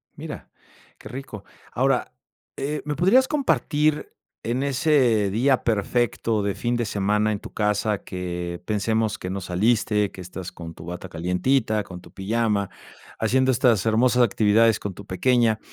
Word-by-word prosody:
Mira, - - -8 0.5
qué - - -11
rico. 125 -5 -8 0.3
Ahora, - - 0 0.4
eh, 150 +2 -2
me 150 0 -2
podrías 215 - +4
compartir 155 - 0 0.3
en 120 +4 -1
ese 130 -6 +2
día 130 +5 +2
perfecto 115 0 0
de 100 -1 -1
fin 120 -1 -1
de 120 - -1
semana 105 +1 +1
en 100 - -4
tu - - -11
casa 105 0 0
que, 90 -1 -5
pensemos 110 +1 0
que 90 - -6
no 95 +1 -3
saliste, 105 +2 +1
que 95 - -10
estás 90 0 -7
con 85 -2 -9
tu 80 - -12
bata 90 +1 -7
calientita, 105 +7 0
con 90 -2 -10
tu - - -16
pijama, 105 0 -1 0.5
haciendo 130 +1 +2
estas 120 -5 +3
hermosas 120 +3 +3
actividades 110 0 +3
con 100 - -5
tu 100 +2 -11
pequeña. 115 +2 +2
110 Hz, 155 wpm, -24 LUFS, 100-125 Hz, 0.5 s, podrías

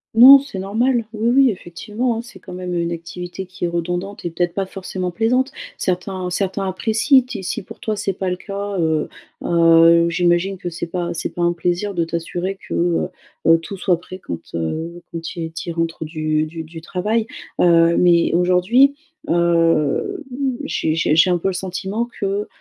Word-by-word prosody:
Non, 265 +4 +10
c'est 275 -8 -8
normal, 230 +5 0
oui, 220 +2 0
oui, 265 +1 +5
effectivement, 210 +7 -3
hein. - - -3
C'est 240 - -13
quand 180 - -11
même, 180 0 -5
heu, 170 - 0
une 170 0 -1
activité 175 +3 -6
qui 180 -1 -5
est - - +1
redondante 175 +4 -3
et 170 - -2
peut-être 175 0 -1
pas 195 -1 0
forcément 185 -1 -5
plaisante, 250 +6 +1 0.3
certains 185 0 -2
certains 195 +1 -1
apprécient 225 +8 +3
ti 210 -7 -6
si 220 +4 -3
pour - - -12
toi, 215 -1 -2
c'est 195 -1 -2
pas 185 0 -2
le - - 0
cas, 200 +1 -5
heu, 160 -2 +1 0.4
heu, 170 0 +5
j'imagine 175 +2 +1
que 180 -1 -5
c'est 170 +1 -5
pas 175 0 -3
c'est 165 - -3
pas 175 - -1
un 175 0 +3
plaisir 180 +4 -1
de 170 -2 0
t'assurer 175 +3 -3
que, - - -9
heu, 170 -1 +1 0.4
heu, 165 0 +6
tout 195 +4 -8
soit 180 -2 +1
prêt 185 +1 -10
quand, 85 - -6 0.2
heu, 160 - -4
quand 165 0 -6
il 165 -1 -4
qu'il 165 +1 -5
rentre 165 -1 -2
du 155 -1 -1
du 160 +1 -7
du 160 +1 -10
travail. 215 +6 -1 0.3
Heu, 170 -1 +5
mais 170 -2 +4
aujourd'hui, 185 +11 +4 0.3
heu, 165 -3 +2 0.4
j'ai 160 - -1
j'ai 160 -1 +2
j'ai 165 +3 +5
un 175 - +3
peu 190 +3 -1
le - - -2
sentiment 190 +5 -3
que, 200 +1 -1
180 Hz, 190 wpm, -20 LUFS, 170-200 Hz, 0.4 s, Non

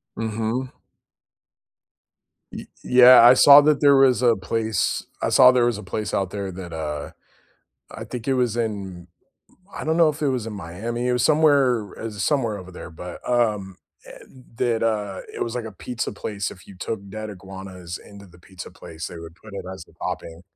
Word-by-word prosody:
Mhm. 115 +3 -3 1.8
Y - - -8 0.2
Yeah, 125 0 +8
I 120 - +9
saw 140 +2 +8
that 150 0 +2
there 140 -1 +6
was 130 -2 +4
a 120 -2 +4
place 110 +3 -2 0.2
I - - 0
saw 130 -1 +7
there 125 -2 +2
was 120 -3 0
a 105 - -9
place 105 +3 -4
out 95 -2 0
there 100 -2 -5
that, 90 -2 -9
uh 75 -2 -5 0.8
I - - -8
think 120 -1 -7
it 135 - +2
was 120 -3 0
in 100 -6 -4 0.7
I - - -6
don't 160 +1 0
know 165 -2 +5
if 150 0 -4
it 145 - +2
was 125 -4 -2
in 110 - -5
Miami, 105 +6 -5
it 125 - +2
was 125 - 0
somewhere, 140 -8 +2
uh 115 - -5
somewhere 110 +1 -1
over 95 -1 -11
there, 90 - -9
but, 90 +2 -9
um 105 -6 0 0.3
and 130 -1 -15
that, 120 -3 0
uh 105 -4 -1
it - - -3
was 115 +1 -4
like 120 - -4
a 110 - -8
pizza 120 +5 -5
place, 100 -1 -4
if 90 - -14
you 100 - -13
took 100 +1 -5
dead 110 0 -6
iguanas 95 -2 -9
into 100 -1 -14
the 90 0 -19
pizza 95 0 -11
place, 80 +1 -9
they 85 - -9
would 85 0 -11
put 105 +1 -14
it - - -6
as 95 -3 -10
a - - -21
topping. 80 +1 -6
110 Hz, 195 wpm, -23 LUFS, 95-125 Hz, 1.8 s, I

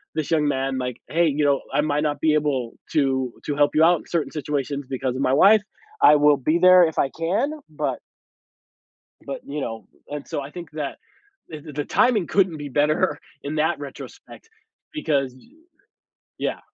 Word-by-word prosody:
this 155 0 -3
young 155 -2 +2
man 135 -1 -1
like, 125 -2 -4
"Hey, 170 +1 +2
you 150 0 +1
know, 140 -1 +2
I - - +3
might 150 0 0
not 150 -1 -1
be 155 -1 +3
able 140 -6 0 0.2
to 130 -4 +1
to 145 - -2
help 145 0 +2
you 155 - +5
out 170 0 +5
in - - -16
certain 170 -3 -1
situations 145 -1 -3
because 130 -1 -2
of 130 - -3
my 130 - +2
wife. 205 +9 +6 0.4
I 150 - +8
will 150 0 +5
be 155 +6 +1
there 185 0 +7
if 160 - -4
I 135 - +2
can, 180 - 0 0.2
but" 150 -4 -3 1.3
"but, 140 - -5
you 145 +1 -5
know" 115 -3 -6 0.2
And, 145 -1 -6
so, - - -3
I 140 +1 -8
think 170 -1 -9
that 150 -3 -5 0.5
the 155 -2 -7
the 150 0 -11
the 145 0 -3
timing 235 -8 +2
couldn't 185 -5 +1
be 145 -1 -6
better 150 +2 +1 0.2
in 145 +2 -4
that 155 +1 +1
retrospect 145 - -11 0.4
because, 140 - -1
eh 235 - -21 0.8
Yeah. - - -2
150 Hz, 190 wpm, -23 LUFS, 140-160 Hz, 1.3 s, I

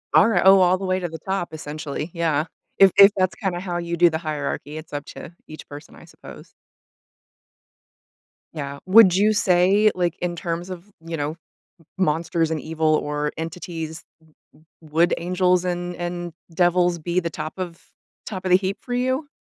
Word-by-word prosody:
Alrigh 210 -5 +5
oh, 195 0 +8
all 180 0 +4
the 195 - -5
way 185 0 0
to 175 -2 -4
the 160 - -7
top, 190 -1 -3
essentially, 155 +1 -6
yeah. 160 -3 0 0.3
If 195 -2 +7
if 200 0 +9
that's 185 -1 +1
kinda 185 -4 -3
how 180 -2 -4
you 170 0 -3
do 175 0 +6
the 160 - -2
hierarchy, 150 -1 -4
it's 155 -1 -10
up 145 0 -4
to 170 - -10
each 155 - -11
person, 145 +1 -11
I - - -15
suppose. - - -14 2.0
Yeah. 140 -2 -5
Would 190 -2 +7
you 210 +3 +3
say, 200 0 +4
like, 175 -2 0
in 175 -1 -2
terms 170 +1 -4
of, 180 0 -8 0.2
you 165 -1 -4
know, 145 +1 -2 0.5
m 165 - -23 0.2
monsters 165 +1 0
and 160 -1 -2
evil 155 0 0
or 150 0 -2
entities, 165 -1 -6 0.6
w 155 - -26 0.2
w 155 -1 -18
would 170 +2 +3
angels 180 +1 +1
and 175 0 -3
and 175 -1 -5 0.2
devils 175 0 +2
be 175 +3 -1
the 170 - -3
top 155 0 -6
of 175 -2 -6 0.5
top 190 -3 -6
of 185 - 0
the 180 - +8
heap 195 +1 -3
for 245 - -6
you? 260 +4 -1
175 Hz, 180 wpm, -22 LUFS, 160-185 Hz, 2.0 s, if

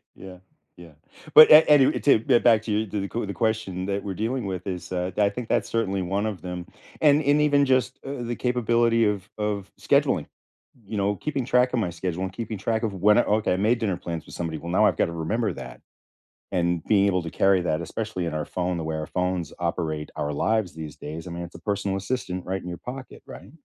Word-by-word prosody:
Yeah, 95 -1 -11 0.4
yeah. 85 -2 -13 0.4
But 155 - +10
a 155 +1 +9
anyway, 145 -3 +5
to 140 -6 +5
get 120 +1 +2
back 115 -3 +5
to 110 - -6
you, 110 +1 0
to 105 0 -3
the 100 - -3
q 115 0 -3
the 100 - -4
question 110 -5 -1
that 100 0 -2
we're 95 -2 -4
dealing 115 +3 -2
with 95 -1 -5
is, 90 -1 -5
uh, 90 0 -1
I 100 -1 +4
think 115 +3 -6
that's - - 0
certainly 100 -4 -1
one 100 +4 -1
of 105 -4 -5
them, 90 -1 -6 0.3
and 150 0 +5
and 145 +1 +3
even 145 -1 +4
just, 130 -2 +1
uh, 135 -2 -5
the 120 0 -3
capability 120 -2 +2
of 100 -1 -1
of 105 -2 -3
scheduling, - - +2 0.6
you 105 - -6
know 100 0 0
keeping 140 +3 -3
track 125 0 +2
of 125 - 0
my 95 -6 -1
schedule 90 +1 -4
and 95 - -5
keeping 110 0 -5
track 110 +4 -1
of 110 -3 -2
when 100 +3 +4
I - - +6
okay, 105 -3 +1
I - - 0
made 110 +5 +2
dinner 100 -5 0
plans 85 -2 -6
with - - -11
somebody, 80 -2 -4
well, 85 +2 -7
now 90 - +4
I've - - +2
got - - +2
to 85 - -6
remember 100 +6 -1
that, - - -9 0.7
and 85 -1 0
being 100 -2 +3
able 90 -2 +1
to 80 - -6
carry 95 +1 +3
that, 80 -2 -1
especially 85 +1 -4
in 80 - -3
our 75 - -2
phone, 90 +3 -2
the 80 - -4
way 80 0 -3
our 80 -1 -4
phones 90 -3 -2
operate 80 -3 -3
our 75 0 -2
lives 110 +4 0
these 80 -2 -8
days, 80 +3 -8
I - - -7
mean, 85 0 -5
it's 85 0 -9
a - - -14
personal 100 -2 -2
assistant 95 -3 -3
right 95 +1 -3
in 90 - -8
your 85 - -6
pocket, 130 +1 -9
right? - - -11
100 Hz, 240 wpm, -25 LUFS, 90-115 Hz, 0.7 s, But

